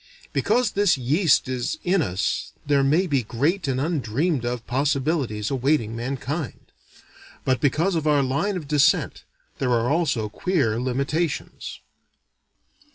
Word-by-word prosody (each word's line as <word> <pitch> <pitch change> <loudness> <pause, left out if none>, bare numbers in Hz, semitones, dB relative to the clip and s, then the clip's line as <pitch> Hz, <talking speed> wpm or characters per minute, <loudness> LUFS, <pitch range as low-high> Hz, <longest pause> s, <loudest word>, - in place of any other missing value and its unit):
Because 245 -3 +2
this 200 -6 +3
yeast 145 +6 +2
is 130 - -2
in 185 0 +2
us 95 - -2
there 140 -1 +3
may 155 +7 +3
be 140 -7 +1
great 145 - -1
and 130 -1 0
undreamed 145 -1 0
of 120 -1 -3
possibilities 135 -4 0
awaiting 130 -4 +1
mankind; 135 +4 -4 0.7
but 130 -2 +1
because 160 +7 +2
of 160 -2 -1
our 145 -2 +4
line 160 +10 0
of 155 -5 -7
descent 150 +2 +2 0.4
there 130 -3 0
are 120 +1 +2
also 145 -9 +1
queer 115 - 0
limitations. 140 +5 -2
140 Hz, 130 wpm, -24 LUFS, 125-160 Hz, 0.7 s, our